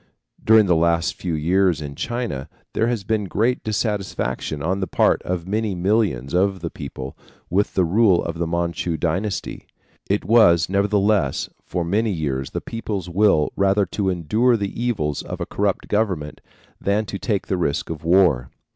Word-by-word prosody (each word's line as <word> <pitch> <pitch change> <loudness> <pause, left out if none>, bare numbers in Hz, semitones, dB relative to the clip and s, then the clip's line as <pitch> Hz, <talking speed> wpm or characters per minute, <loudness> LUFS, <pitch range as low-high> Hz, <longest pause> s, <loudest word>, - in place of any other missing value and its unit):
During 110 -1 +6
the 90 -3 +3
last 85 +1 +2
few 85 -3 -3
years 90 +2 +2
in 75 -2 -6
China 120 - -4 0.2
there 115 - +1
has 120 -4 -1
been 105 0 0
great 115 +7 0
dissatisfaction 100 - -2
on 95 +4 0
the 95 - -2
part - - +2
of 90 -1 -3
many 105 0 -1
millions 90 - 0
of 95 +1 +1
the 85 - -4
people 70 -2 -7 0.4
with 100 +4 +1
the 95 - +3
rule 95 0 +3
of 85 0 -4
the 85 - 0
Manchu 85 0 -1
dynasty. 90 +5 -2 0.4
It 100 +2 0
was, 85 -8 +5
nevertheless, 100 -5 +1 0.2
for 90 -2 -2
many 105 +6 +1
years 70 -6 -2
the - - -4
people's 105 -6 -4
will 95 -5 +3
rather 100 +1 +2
to 95 +2 -2
endure 105 +8 +2
the 100 -2 -3
evils 80 -12 -1
of - - -7
a - - -2
corrupt 100 -1 -1
government 95 -9 -1 0.4
than 105 +2 0
to 100 - -6
take 105 -5 -1
the 95 - -1
risk 80 -2 -1
of 80 -2 -6
war. 85 -8 +3
95 Hz, 170 wpm, -22 LUFS, 80-105 Hz, 0.4 s, During